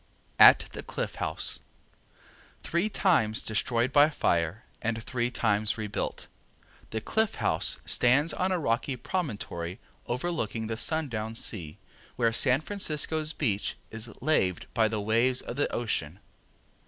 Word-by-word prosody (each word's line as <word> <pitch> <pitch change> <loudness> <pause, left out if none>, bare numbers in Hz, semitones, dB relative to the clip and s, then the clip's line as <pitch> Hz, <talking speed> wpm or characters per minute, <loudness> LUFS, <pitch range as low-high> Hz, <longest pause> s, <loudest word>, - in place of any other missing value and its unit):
At - - +8
the - - -6
Cliff - - -4
House - - -1 1.0
Three 170 +6 0
times 160 - +2
destroyed 120 +3 0
by 145 +1 +6
fire, 85 - 0 0.2
and 115 0 -2
three 120 0 -1
times 110 -2 0
rebuilt, 105 -2 -4 0.6
the 110 - -3
Cliff 220 - 0
House 80 - +2
stands 135 +6 +3
on 185 +1 0
a 185 - +1
rocky 130 -2 -1
promontory 105 - -4 0.3
overlooking 120 -5 -2
the 115 +1 -3
Sundown 115 -5 -1
Sea, 85 -9 -4 0.4
where 115 -2 +1
San 130 +3 +4
Francisco's 155 -4 0
beach 110 -11 -1
is 115 +1 -2
laved 95 - +1
by 110 -2 +3
the 110 -1 -2
waves 115 +5 +2
of 120 - -6
the 145 - 0
Ocean. 95 -7 -2
120 Hz, 130 wpm, -28 LUFS, 110-150 Hz, 1.0 s, At